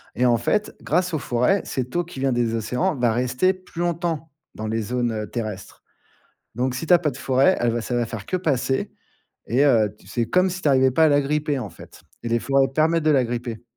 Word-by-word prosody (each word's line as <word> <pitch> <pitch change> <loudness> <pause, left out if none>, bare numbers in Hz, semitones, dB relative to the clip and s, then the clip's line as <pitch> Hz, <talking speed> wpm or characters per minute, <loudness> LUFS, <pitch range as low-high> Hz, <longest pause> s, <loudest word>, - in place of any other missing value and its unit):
et, 125 - +1
en 120 -1 +4
fait, 210 - 0
grâce 180 +1 0
aux 155 - 0
forêts, 125 +13 +1
cette 125 +3 -4
eau 175 - +2
qui 165 -5 -10
vient 135 -1 +1
des 120 -2 0
océans 125 - -1
va 120 -3 +1
rester 125 +10 +1
plus 185 -2 -9
longtemps 165 -3 -2 0.2
dans 110 0 -5
les 110 +1 -1
zones, 120 +2 -1
heu, 105 -1 -4
terrestres. 110 -5 -6 0.7
Donc, 125 +1 -1
si 145 +5 -4
tu 180 - +3
as 175 - +8
pas 155 -3 0
de 125 - -10
forêt, 135 +7 +3
elle 120 -1 +2
va 120 - -1
ça 120 - -3
va 120 -1 0
faire 110 -3 -7
que 185 - -1
passer 135 -6 -1 0.6
et 130 +5 +2
heu, 110 -7 +3
c'est 120 -2 -2
comme 185 +9 +2
si 185 +1 -5
tu - - 0
arrivais 130 -1 +4
pas 160 +5 +3
à - - +6
l'agripper, 145 0 +1
en 105 -5 -5
fait 85 - -15 0.2
et 115 - -2
les 115 0 +2
forêts 135 +1 +2
permettent 160 +2 +2
de 155 - +3
l'agripper. 120 -3 -1
130 Hz, 230 wpm, -23 LUFS, 120-160 Hz, 0.7 s, as